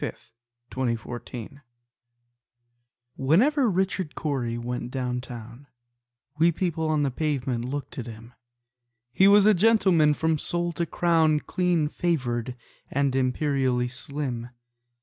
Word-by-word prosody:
Richard 120 +1 -5
Cory 120 +2 -8 1.6
Whenever 235 - +3
Richard 190 -3 -1
Cory 125 -6 -2
went 120 0 -4
down 125 -1 -2
town, 120 +2 -10 0.7
We 170 +2 +5
people 165 -2 -2
on 155 -2 +2
the 140 - 0
pavement 130 -4 -2
looked 140 +1 -5
at 120 - -5
him: 115 +1 -11 0.8
He 190 +10 +5
was 200 0 +7
a 215 - +7
gentleman 185 -7 +4
from 160 0 0
sole 175 +2 -1
to 170 0 -2
crown, 160 -3 +2
Clean 175 -4 0
favored, 125 -8 -2 0.3
and 140 -1 0
imperially 130 -1 +1
slim. 130 -3 -4
140 Hz, 115 wpm, -26 LUFS, 125-170 Hz, 1.6 s, was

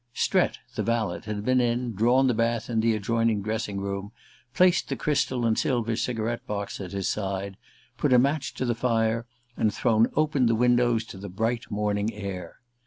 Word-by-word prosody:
Strett, - - +2 0.2
the - - -2
valet, 115 -6 -1
had 105 -1 -4
been 130 0 +3
in, 120 0 0
drawn 120 +6 +3
the 125 - +3
bath 115 +1 0
in 115 - +1
the 115 0 +2
adjoining 115 0 0
dressing 110 -1 -2
room, 100 +1 -4 0.4
placed 180 +5 +3
the - - -1
crystal 140 -5 0
and 110 -1 +2
silver 120 -3 0
cigarette 115 0 -2
box 100 -1 -4
at 90 -2 -6
his 100 -1 -2
side, 100 -1 -2 0.4
put 145 - +1
a 125 - +7
match 140 +3 +1
to 130 - -2
the 120 - +1
fire, 115 -1 0 0.3
and 110 - +1
thrown 115 0 +3
open 150 -5 +2
the 115 - +3
windows 120 -1 +3
to 95 - -10
the 100 +1 -7
bright 115 +5 -2
morning 105 +1 -1
air. 95 -4 -6
115 Hz, 185 wpm, -26 LUFS, 105-120 Hz, 0.4 s, a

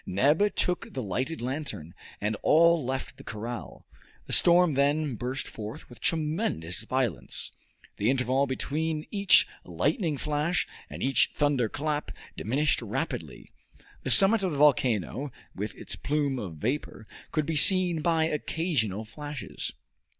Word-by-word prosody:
Neb 150 - +2
took 180 -5 -1
the 130 - -2
lighted 130 - -3
lantern, 130 - -4 0.3
and 105 +1 -1
all 170 0 +5
left 130 +1 -4
the - - -12
corral. 115 +2 -7 0.4
The - - -5
storm 175 -2 +5
then 145 +1 +1
burst 125 +4 -3
forth 110 0 -8
with 120 - -14
tremendous 155 - -1
violence. 120 -3 -2 0.5
The 105 - +1
interval 130 +1 +2
between 155 +4 -2
each 200 -2 +5 0.2
lightning 165 - -1
flash 150 +5 0 0.2
and - - -6
each 135 +1 +3
thunder 140 -6 +1
clap 150 +3 -2 0.3
diminished 140 +7 +1
rapidly. - - -4 0.5
The - - -4
summit 200 +2 +6
of 190 -2 0
the - - -3
volcano, 135 -2 +2 0.2
with 105 +3 -5
its - - -4
plume 140 -2 -1
of 90 -7 -6
vapor, 115 - -3 0.2
could 155 -2 0
be 160 - -2
seen 175 +1 +6
by 165 -1 +2
occasional 150 - -1
flashes. 145 +4 -6
145 Hz, 135 wpm, -28 LUFS, 120-160 Hz, 0.5 s, summit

